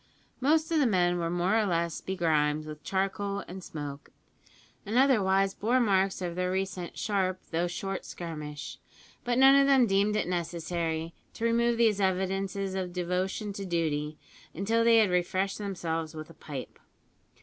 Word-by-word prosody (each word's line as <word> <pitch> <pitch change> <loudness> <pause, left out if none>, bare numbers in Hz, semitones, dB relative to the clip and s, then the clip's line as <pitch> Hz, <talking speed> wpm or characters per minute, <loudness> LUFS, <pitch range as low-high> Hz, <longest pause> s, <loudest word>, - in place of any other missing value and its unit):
Most 315 +4 +2
of 320 - +3
the 280 - +4
men 175 -4 +2
were 165 -1 -1
more 175 +4 +1
or 215 - +1
less 170 -2 -1
begrimed 155 -5 0
with 155 0 -9
charcoal 200 +1 -1
and 185 +1 -8
smoke, 145 -3 -7 0.7
and 220 +4 -2
otherwise 195 -7 +3
bore 240 +5 +1
marks 195 -4 +2
of 175 -1 -2
their 180 +1 -1
recent 190 -2 -3
sharp 190 -3 0
though 170 +2 +1
short 195 +2 -4
skirmish, 150 -4 -7 0.4
but 240 0 0
none 270 +1 +8
of 275 0 +5
them 270 -3 +5
deemed 200 0 +2
it 215 - 0
necessary 170 -1 -2 0.2
to 230 - -3
remove 235 0 +2
these 220 -3 +3
evidences 190 +1 -1
of 185 -2 -3
devotion 185 +4 -2
to 200 - -5
duty 155 -4 -1 0.4
until 225 +6 +1
they 230 0 +6
had 215 -4 +4
refreshed 185 +3 0
themselves 165 -5 -3
with 155 +1 -8
a - - -13
pipe. 145 -4 -8
190 Hz, 160 wpm, -29 LUFS, 170-205 Hz, 0.7 s, none